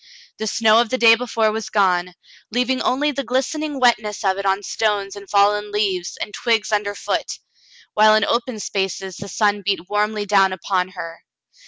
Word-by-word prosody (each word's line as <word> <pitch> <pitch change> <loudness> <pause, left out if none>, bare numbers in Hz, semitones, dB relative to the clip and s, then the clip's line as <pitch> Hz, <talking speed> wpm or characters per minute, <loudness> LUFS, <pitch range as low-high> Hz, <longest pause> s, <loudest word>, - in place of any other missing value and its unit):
The 220 - -3
snow 225 +1 +4
of 240 - -2
the 255 - -1
day 230 -2 +7
before 230 -2 0
was 220 0 -5
gone, 180 -3 +1 0.3
leaving 250 +3 0
only 295 +4 +1
the 275 0 -4
glistening 275 +4 -2
wetness 215 -5 +1
of 190 0 +1
it 200 - -2
on 195 +1 0
stones 205 -2 -1
and 200 -1 -11
fallen 205 +1 +2
leaves 195 -4 -1
and 210 - -5
twigs 225 -2 0
under 205 -1 -1
foot, - - -3 0.6
while 215 0 +5
in 215 -1 +3
open 235 -1 -1
spaces 190 -2 -3
the 200 - -8
sun 205 +1 +1
beat 190 -2 -2
warmly 210 0 -1
down 195 -2 +3
upon 185 0 -1
her. 165 -2 -8
210 Hz, 180 wpm, -20 LUFS, 195-230 Hz, 0.6 s, day